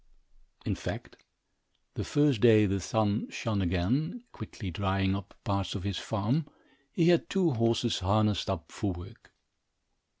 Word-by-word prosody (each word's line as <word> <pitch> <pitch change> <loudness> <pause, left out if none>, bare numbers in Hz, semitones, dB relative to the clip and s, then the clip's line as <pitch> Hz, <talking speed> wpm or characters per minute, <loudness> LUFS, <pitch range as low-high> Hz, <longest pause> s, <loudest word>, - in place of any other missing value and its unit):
In - - 0
fact, - - -6 0.8
the - - -3
first 145 -7 +2
day 110 -3 +7
the 100 0 0
sun 105 +2 0
shone 105 -3 -2
again, 120 - 0
quickly 100 -6 -7
drying 95 +1 0
up 100 -2 -7
parts 100 0 -1
of 100 - -4
his 100 -2 -2
farm, 115 +9 -1 0.4
he 165 +3 +3
had 170 -1 +3
two 185 -4 +2
horses 115 -1 +1
harnessed 105 +1 +1
up 85 -4 -3
for 100 -4 -2
work. 90 0 -12
105 Hz, 140 wpm, -30 LUFS, 95-120 Hz, 0.8 s, day